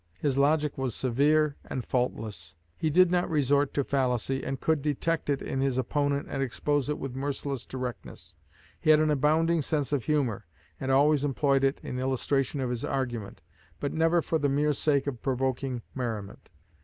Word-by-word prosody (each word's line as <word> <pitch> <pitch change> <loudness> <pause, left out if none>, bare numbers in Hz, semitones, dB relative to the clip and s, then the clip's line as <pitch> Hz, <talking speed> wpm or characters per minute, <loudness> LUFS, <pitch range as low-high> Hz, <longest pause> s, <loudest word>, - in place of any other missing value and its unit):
His 140 -3 0
logic 150 +1 +2
was 130 -3 -1
severe 145 +4 +2
and 130 -3 -5
faultless. 110 -9 -3 0.2
He 160 - -1
did 180 +3 +5
not 175 -1 +1
resort 145 -2 +2
to 140 - +2
fallacy, 135 -1 0
and 135 -1 -3
could 160 -2 +1
detect 155 +2 -1
it 140 -1 0
in 135 - -2
his 135 -2 0
opponent 145 +2 0
and 135 - -3
expose 145 +2 0
it 150 - -1
with 135 -2 -6
merciless 135 -1 -3
directness. 125 -10 -6 0.5
He 160 - -1
had 155 -1 +7
an 155 0 +2
abounding 155 +3 +2
sense 145 0 -1
of 130 -6 0
humor, 125 - 0 0.3
and 130 - -3
always 145 +1 +4
employed 140 -1 +2
it 135 0 +2
in 125 - -4
illustration 135 +1 0
of 125 -2 -1
his 120 -1 -3
argument 120 -6 -3 0.4
but 140 - -2
never 165 +1 +2
for 160 - 0
the 145 -1 +1
mere 150 +2 +2
sake 140 -1 +1
of 130 -5 -4
provoking 130 -2 -1
merriment. 110 -6 -5
140 Hz, 180 wpm, -28 LUFS, 130-150 Hz, 0.5 s, had